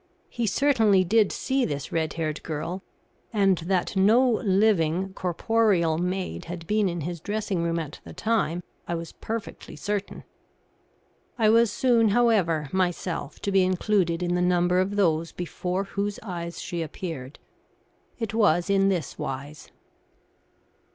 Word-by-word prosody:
He 235 -2 -1
certainly 220 -5 +3
did 210 +2 +3
see 265 0 0
this 145 - -3
red 160 -2 -1
haired 155 -2 -3
girl, 165 +4 -4 0.5
and 195 -5 +3
that 180 +3 -1
no 220 +7 +5
living, 190 -4 +2
corporeal 180 -3 +1
maid 180 +1 -3
had 170 -1 -7
been 210 +1 +1
in 170 -1 -4
his 170 +2 -4
dressing 205 -1 -2
room 170 0 0
at 155 -3 -5
the - - -10
time 205 -6 -1 0.2
I 170 - -1
was 165 -1 -6
perfectly 225 -1 -6
certain. 205 -1 -4 1.1
I 215 -2 +4
was 230 -1 +4
soon, 235 -1 +3
however, 195 -10 +2
myself 175 -5 -2
to 200 - -1
be 195 -1 +4
included 185 -2 +1
in 175 0 0
the 180 - +1
number 180 0 +3
of 190 +2 0
those 165 -4 +1
before 180 +2 -3
whose 200 +1 -3
eyes 170 -4 -5
she 170 -1 -4
appeared. 155 -4 -6 0.8
It 225 -3 -4
was 200 -4 +3
in 195 0 +4
this 180 -5 -2
wise. 140 +3 -6
185 Hz, 145 wpm, -26 LUFS, 170-210 Hz, 1.1 s, no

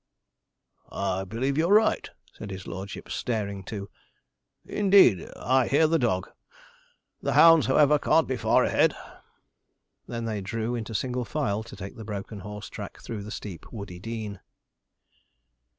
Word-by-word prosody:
'I 95 -1 -2
believe 130 +8 -1
you're 170 +4 +2
right,' 220 0 +3 0.2
said - - -8
his 95 -1 -7
lordship, 95 +1 -7
staring 100 -4 -2
too; 100 0 -6 0.8
'indeed, 195 - +4
I 130 0 +2
hear 150 +3 +4
the 165 +1 +2
dog. 95 -7 0 0.9
The - - -1
hounds, 165 -2 +7
however, 145 +2 +5
can't 160 +2 +3
be 130 - -1
far 115 -2 +3
ahead.' - - +3 1.1
They 120 - -4
then 110 -3 -3
drew 115 +4 -3
into 115 -2 -4
single 125 +2 -1
file 105 -1 -1
to 115 - -10
take 100 +6 -8
the 110 - -7
broken 105 0 -6
horse 105 +2 -7
track - - -8
through 110 -3 -6
the 105 - -8
steep 100 -6 -8
woody 100 -6 -7
dean. 110 -1 -5
110 Hz, 145 wpm, -27 LUFS, 100-130 Hz, 1.1 s, hounds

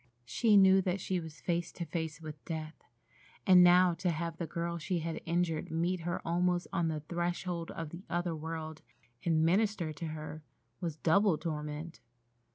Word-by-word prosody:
She 210 - +4
knew 190 0 +7
that 185 +1 -1
she 185 0 -1
was 160 -2 -9
face 170 -1 -1
to 170 - -5
face 160 -1 -4
with 155 -2 -9
death, 155 -1 -5 0.7
and 180 -1 +8
now 180 0 +6
to 180 +2 -1
have 165 0 -2
the 170 - -3
girl 170 +2 -3
she 180 +3 -1
had 165 0 -3
injured 165 -1 0
meet 170 +3 0
her 175 0 -4
almost 175 +1 +1
on 170 -4 +1
the 155 -1 -2
threshold 175 +1 -3
of 165 -2 -5
the 170 - -8
other 175 -1 -1
world, 160 0 -5 0.4
and 160 -2 +3
minister 185 -2 +1
to 165 - -6
her, 155 0 -6 0.4
was 170 -4 -3
double 175 +3 +3
torment. 150 -3 -5
170 Hz, 170 wpm, -32 LUFS, 160-180 Hz, 0.7 s, and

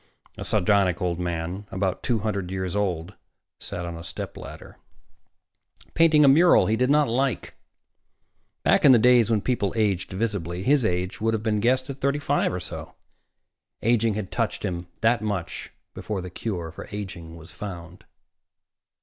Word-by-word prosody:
A - - -6
sardonic 95 -2 +2
old 90 -1 -1
man, 90 +3 -4
about 95 -1 -2
two 120 - 0
hundred 100 -4 -2
years 95 -1 -3
old, 95 -3 -1 0.5
sat 85 - -5
on 85 -1 -5
a 85 - -8
stepladder, - - -8 1.2
painting 160 -3 +5
a - - +6
mural 165 +6 +6
he 110 - +1
did 125 +3 +1
not 150 0 +4
like. 125 +1 -1 1.1
Back - - +3
in 140 - +8
the - - +7
days 120 0 +5
when 110 -3 +2
people 110 -5 -1
aged 100 -5 0
visibly, 95 -4 -3
his 140 +3 +3
age 90 -2 -1
would 115 0 +1
have 110 - -4
been 110 -2 +1
guessed 130 +4 +2
at 135 - -9
thirty 140 +1 +1
five 145 0 0
or 90 - -3
so. - - -7 0.9
Aging 115 -2 +2
had 105 -3 -4
touched - - -2
him 85 -1 -4
that 115 -1 +3
much 100 -5 -4 0.2
before 105 -2 -4
the 90 0 -8
cure 90 -5 -4
for - - -9
aging 90 -5 -7
was 85 0 -12
found. 90 -1 -8
105 Hz, 165 wpm, -25 LUFS, 90-120 Hz, 1.2 s, in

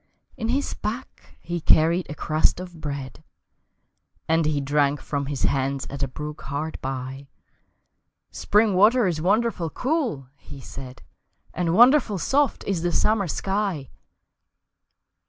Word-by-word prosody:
In 225 - -3
his 275 +3 0
pack 230 +5 -7
he 175 0 -4
carried 165 +3 +3
a 150 - -5
crust 155 +3 +1
of 175 -3 -9
bread, 140 -3 -6 1.0
And 160 -1 +2
he 150 -2 +1
drank 145 0 +1
from 140 0 -3
his 140 -2 -3
hands 135 -1 0
at 140 0 -6
a 135 - +1
brook 150 +3 -7
hard 145 +3 -4
by; 135 +1 -5 1.0
"Spring 210 0 +2
water 215 +6 +5
is 170 -4 -1
wonderful 205 -2 +1
cool," 250 - -1
he 140 - -12
said, 130 -1 -10 0.5
"And 170 0 0
wonderful 240 -2 +5
soft 280 - +1
is 190 -4 -1
the 175 0 0
summer 210 -1 +2
sky!" 190 -5 -2
165 Hz, 135 wpm, -24 LUFS, 140-210 Hz, 1.0 s, water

